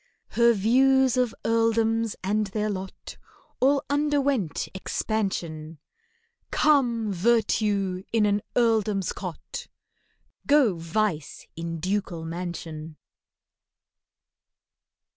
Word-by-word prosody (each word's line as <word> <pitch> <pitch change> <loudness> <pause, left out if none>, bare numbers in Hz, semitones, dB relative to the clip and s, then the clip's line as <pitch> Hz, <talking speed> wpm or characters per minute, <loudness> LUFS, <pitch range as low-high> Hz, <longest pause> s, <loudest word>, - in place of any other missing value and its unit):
Her 235 0 +4
views 260 +4 +4
of 250 -3 +1
earldoms 225 -1 +2
and 210 +2 0
their 210 +2 -2
lot, 190 -1 -7 0.4
All 275 +2 +3
underwent 285 - 0
expansion— 170 -6 -3 0.7
Come, 240 -8 +2
Virtue 205 -2 +1
in 225 -2 +3
an 205 0 +1
earldom's 215 -5 +2
cot! 180 -4 -7 0.8
Go, 280 -8 +5
Vice 165 -2 -2
in 165 0 -4
ducal 185 -2 -2
mansion! 165 -2 -6
210 Hz, 85 wpm, -26 LUFS, 180-235 Hz, 0.8 s, Go